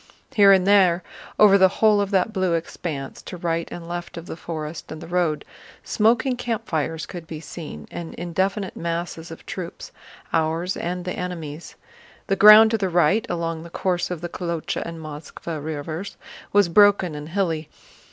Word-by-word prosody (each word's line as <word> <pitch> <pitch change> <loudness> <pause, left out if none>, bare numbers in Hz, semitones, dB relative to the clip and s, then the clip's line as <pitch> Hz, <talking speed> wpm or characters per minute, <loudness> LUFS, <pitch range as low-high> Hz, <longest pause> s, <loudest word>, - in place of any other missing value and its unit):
Here 200 -2 +7
and 190 -2 +5
there 185 -3 +4 0.3
over 200 -2 +7
the 190 - +7
whole 210 +2 +3
of 200 - -1
that 195 +2 +1
blue 185 -4 +1
expanse, 160 -4 -5
to 180 - -8
right 170 -1 -2
and 170 -1 -7
left 175 0 -6
of 170 - -7
the - - -6
forest 160 -1 -6
and 155 - -6
the - - -9
road, 175 -3 0 0.4
smoking 230 +4 +2
campfires 165 -10 -2
could 170 -3 -9
be 155 -1 -6
seen 150 - -8
and 170 -1 -7
indefinite 190 +3 -2
masses 170 0 -4
of 165 - -11
troops—ours 170 -1 -4
and 180 +1 -4
the 180 - -2
enemy's. 170 -3 -6 0.5
The 195 - +1
ground 215 +2 +9
to 225 - +1
the 190 -2 0
right—along 170 -1 +1
the 170 - -10
course 180 0 -1
of 180 -3 -4
the 175 - -4
Kolochá 170 -2 -3
and 165 -1 -7
Moskvá 155 0 -7
rivers—was 160 +5 -2
broken 200 -2 +5
and 150 +1 -7
hilly. 165 -4 -1
175 Hz, 160 wpm, -23 LUFS, 160-195 Hz, 0.5 s, ground